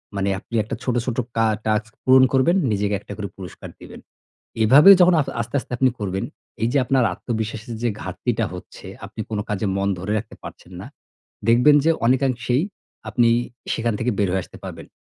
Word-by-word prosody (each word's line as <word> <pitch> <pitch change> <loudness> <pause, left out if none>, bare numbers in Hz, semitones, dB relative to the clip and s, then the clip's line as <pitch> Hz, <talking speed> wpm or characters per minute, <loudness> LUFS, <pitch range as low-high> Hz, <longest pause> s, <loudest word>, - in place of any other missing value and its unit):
মানে 100 0 0
আপনি 115 - -9
একটা 110 - -5
ছোট, 125 -2 -1
ছোট 125 -2 -3 0.2
কা 115 - +3 0.2
task 110 0 0
পূরণ 130 +1 +6
করবেন, 135 +7 +3 0.2
নিজেকে 100 0 0
একটা - - -10
করে 105 -2 -4
পুরস্কার 95 -2 -9
দিবেন। - - -11 0.6
এভাবে 140 - +7
যখন 180 0 +6
আ - - +3 0.2
আস্তে, 115 +5 -6
আস্তে - - -13
আপনি 130 0 +3
করবেন, 95 -1 -3 0.4
এই - - +3
যে - - +3
আপনার 130 -1 +2
আত্মবিশ্বাসের 110 +2 -5
যে 120 - +2
ঘাটতিটা 115 -2 -2
হচ্ছে, 90 - -11 0.2
আপনি - - -7
কোন 110 -2 -2
কাজে 105 0 -2
মন 100 0 0
ধরে 100 +3 -4
রাখতে 105 - -7
পারছেন - - -11
না। - - -8 0.6
দেখবেন 125 +6 +6
যে 165 - +5
অনেকাংশেই 130 +1 +1 0.5
আপনি 120 -2 +3 0.5
সেখান 115 -1 -1
থেকে 120 +1 0
বের 100 - +2
হয়ে 95 -1 0
আসতে - - -14
পারবেন। - - -8
115 Hz, 185 wpm, -22 LUFS, 105-130 Hz, 0.6 s, এভাবে